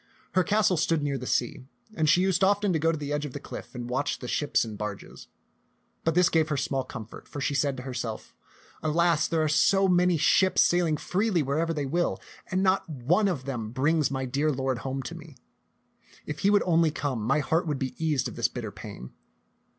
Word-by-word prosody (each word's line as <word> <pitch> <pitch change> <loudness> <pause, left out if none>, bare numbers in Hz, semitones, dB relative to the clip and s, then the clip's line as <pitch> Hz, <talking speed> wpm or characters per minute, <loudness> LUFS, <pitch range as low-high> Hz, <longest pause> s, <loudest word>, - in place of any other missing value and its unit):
Her 185 - +3
castle 205 -3 +2
stood 160 -1 +1
near 140 -2 -1
the 125 - -6
sea, 125 +1 -1 0.3
and 155 -6 +1
she 180 - +5
used 190 -1 +2
often 200 0 +3
to 160 - +1
go 165 +2 +2
to 160 - -3
the 145 0 -4
edge 150 0 -1
of 145 -4 -6
the - - -5
cliff 120 - -9
and 120 -1 -5
watch 130 +4 -1
the 125 - -8
ships 145 -1 +1
and 110 -2 -7
barges; 105 -1 -7 0.8
but 165 -1 0
this 180 -1 +5
gave 160 -1 +2
her 150 - 0
small 135 0 -1
comfort, 115 -4 -10
for 145 - -7
she 140 - -1
said 140 -1 0
to 125 - -7
herself, 120 -4 -5 0.5
"Alas, 165 +1 +2
there 165 -2 +1
are - - +2
so 195 +5 +3
many 180 -1 +3
ships 185 +5 +4
sailing 170 -3 +2
freely 185 +1 0
wherever 155 +5 0
they 150 -3 -2
will, 170 +6 0 0.3
and 190 +1 0
not 190 -1 +2
one 155 - +1
of 150 -9 -2
them 120 -6 -4
brings 145 +5 +1
my 135 -1 -2
dear 140 +4 0
lord 130 -2 -1
home 135 +2 -4
to 165 - -6
me. 165 -5 -12 0.9
If 150 - -5
he 200 - +3
would 205 0 +4
only 165 -2 +3
come, 140 -6 -3
my 130 +8 +1
heart 160 +3 0
would 150 -2 -1
be 130 -1 -3
eased 150 -4 +1
of - - -8
this - - +1
bitter - - -6
pain." 60 +1 -9
150 Hz, 220 wpm, -27 LUFS, 130-170 Hz, 0.9 s, she